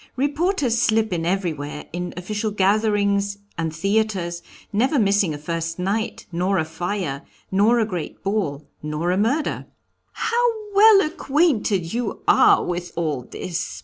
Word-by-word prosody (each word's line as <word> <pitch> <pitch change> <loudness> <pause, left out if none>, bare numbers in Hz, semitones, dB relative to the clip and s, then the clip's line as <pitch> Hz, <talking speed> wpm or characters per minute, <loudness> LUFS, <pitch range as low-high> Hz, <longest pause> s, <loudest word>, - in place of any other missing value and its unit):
Reporters 285 - +1
slip 220 -3 +2
in 165 -1 -1
everywhere, 160 -6 -2
in 175 +1 -3
official 210 +4 -2
gatherings, 200 0 +1 0.2
and 165 -1 -2
theatres, 190 -1 -1 0.3
never 260 +8 +2
missing 200 -5 +3
a 150 - -4
first 165 +2 -3
night, 200 +5 -2
nor 180 +3 0
a 160 - +1
fire, 160 -3 -3 0.3
nor 210 +5 +4
a 225 - +2
great 180 -7 -6
ball, 185 -8 -2
nor 150 +3 -2
a 185 - +1
murder." 270 +9 0 0.5
"How 480 +1 +1 0.2
well 410 0 +7
acquainted 270 - +1
you 240 +1 -3
are 410 -2 +6
with 175 0 -3
all 150 -7 -2
this!" 175 -1 -4
200 Hz, 140 wpm, -22 LUFS, 170-225 Hz, 0.5 s, well